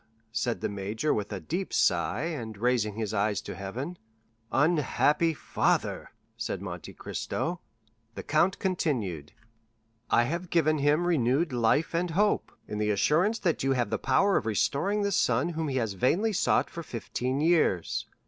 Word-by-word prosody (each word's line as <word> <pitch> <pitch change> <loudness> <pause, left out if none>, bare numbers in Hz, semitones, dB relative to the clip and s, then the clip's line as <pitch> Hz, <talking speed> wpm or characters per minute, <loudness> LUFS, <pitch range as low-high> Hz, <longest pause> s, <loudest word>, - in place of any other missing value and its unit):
said 115 +1 -1
the - - 0
major 100 +8 -1
with 105 -1 -3
a 100 - -3
deep 175 - -4
sigh, 85 +5 +2
and 120 -11 -4
raising 115 -2 +1
his 110 -1 -3
eye 105 0 +1
to - - -4
heaven. 130 - -6 0.5
"Unhappy 150 +1 +2
father," 155 - -1 0.3
said - - -3
Monte - - -7
Cristo. 175 +1 -3 0.6
The - - -6
count 170 +5 +2
continued: 115 - -2 0.8
"'I 120 - +4
have 170 +7 -3
given 155 -3 +2
him 150 +4 +2
renewed 145 -1 +2
life 120 +8 +2
and 175 +1 0
hope, 205 +6 +1 0.2
in 105 - -4
the 105 0 +1
assurance 165 - +2
that 175 -7 0
you 135 0 +2
have 125 -2 -1
the - - 0
power 195 +9 +3
of 110 - -2
restoring 190 - +1
the 200 - 0
son 130 -5 +2
whom 160 -2 -2
he 135 - -2
has 110 -5 -1
vainly 175 - +1
sought - - +2
for 170 - -6
fifteen 130 -1 -3
years. 155 - +2
140 Hz, 160 wpm, -28 LUFS, 110-170 Hz, 0.8 s, I